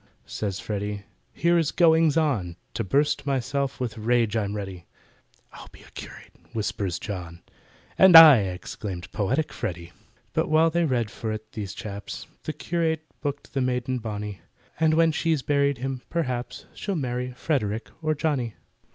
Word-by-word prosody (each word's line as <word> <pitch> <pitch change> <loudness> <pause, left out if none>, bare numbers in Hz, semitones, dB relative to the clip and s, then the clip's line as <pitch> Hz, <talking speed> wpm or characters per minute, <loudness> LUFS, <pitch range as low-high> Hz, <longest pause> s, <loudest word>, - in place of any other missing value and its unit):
Says 100 -3 -4
FREDDY, 105 0 -4 0.3
"Here 170 0 +2
is 160 -3 0
goings 165 -3 +4
on! 115 - 0 0.2
To 115 - -2
bust 145 +8 +1
myself 135 +1 -1
with 115 -3 -3
rage 115 -1 +2
I'm 105 -2 -1
ready." 95 -4 -6 0.7
"I'll - - -11
be - - -16
a - - -18
curate!" - - -10 0.2
whispers 100 -5 -2
JOHN— 85 -5 -7 0.6
"And 190 -2 +8
I," 155 -6 +11
exclaimed 95 -1 -5
poetic 125 +9 -1
FREDDY. 85 -1 -5 0.4
But - - 0
while 160 +1 +4
they 170 +1 +2
read 120 -7 0
for 110 - -4
it, 110 0 -6
these 100 -3 -6
chaps, 100 -1 -7 0.2
The 155 - -2
curate 160 0 -1 0.2
booked 145 -1 -4
the 135 - 0
maiden 125 0 -1
bonny— 105 -4 -5 0.4
And 160 -1 +4
when 165 0 +4
she's 155 -2 0
buried 140 0 +2
him, 130 0 -4
perhaps, 130 -7 -3
She'll 200 - -3
marry 125 -3 -2
FREDERICK 115 -6 -2
or 155 -1 0
JOHNNY. 140 -8 -1
125 Hz, 155 wpm, -25 LUFS, 105-155 Hz, 0.7 s, I